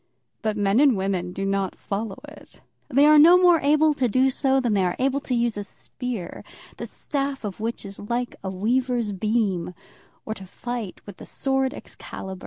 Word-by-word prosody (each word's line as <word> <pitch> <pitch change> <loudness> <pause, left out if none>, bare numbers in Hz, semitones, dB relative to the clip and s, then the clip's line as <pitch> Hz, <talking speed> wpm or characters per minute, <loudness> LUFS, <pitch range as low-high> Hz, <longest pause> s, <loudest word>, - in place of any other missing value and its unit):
But 215 -1 -1
men 205 +2 +2
and 275 -6 +5
women 190 -2 -2
do 195 +2 -4
not 195 -1 -1
follow 200 0 -4
it. - - -15 0.3
They 280 +1 +5
are 305 0 +7
no 340 +4 +8
more 355 -2 +5
able 305 +2 +3
to 265 -3 0
do 260 +4 +3
so 270 0 +2
than 240 -4 0
they 195 -2 +2
are 180 -1 0
to 270 0 -1
use 235 -2 0
a 205 - -3
spear, 230 -2 -7 0.3
the - - -5
staff 275 -2 -3
of 205 -2 -5
which 225 0 -4
is 195 0 -9
like 240 +4 -3
a 190 - -3
weaver's 235 +3 0
beam, 195 -3 -1 0.5
or 220 - -3
to 190 -3 -11
fight 235 -1 -6
with 200 -2 -10
the - - -10
sword 270 -1 0
Excalibur. 190 -1 -9
230 Hz, 190 wpm, -24 LUFS, 195-265 Hz, 0.5 s, no